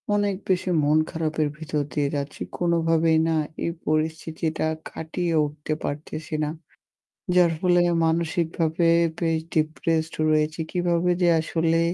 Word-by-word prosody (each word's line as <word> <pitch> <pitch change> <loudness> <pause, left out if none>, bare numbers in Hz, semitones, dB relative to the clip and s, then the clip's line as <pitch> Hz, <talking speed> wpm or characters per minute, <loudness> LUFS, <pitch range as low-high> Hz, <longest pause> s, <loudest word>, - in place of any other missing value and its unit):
অনেক 205 -1 +1
বেশি 185 0 +1
মন 150 +2 +3
খারাপের 155 -1 -1
ভিতর 155 -1 -2
দিয়ে 145 -2 +1
যাচ্ছি। 140 0 -5 0.2
কোনোভাবেই 165 -2 +2
না 160 - +1 0.3
এই 170 - 0 0.2
পরিস্থিতিটা 160 +1 -1 0.2
কাটিয়ে 165 +1 -3
উঠতে 150 +1 -4
পারতেছি 155 +2 -5
না। 150 - -1 0.9
যার 175 -2 +5
ফলে 175 -1 +3 0.2
মানসিকভাবে 165 0 0 0.3
বেশ 165 -2 +1
depressed 160 0 0 0.2
রয়েছি। 155 +1 +1
কিভাবে 175 0 +1
যে 175 - +5
আসলে 165 0 +1
160 Hz, 120 wpm, -24 LUFS, 155-170 Hz, 0.9 s, যার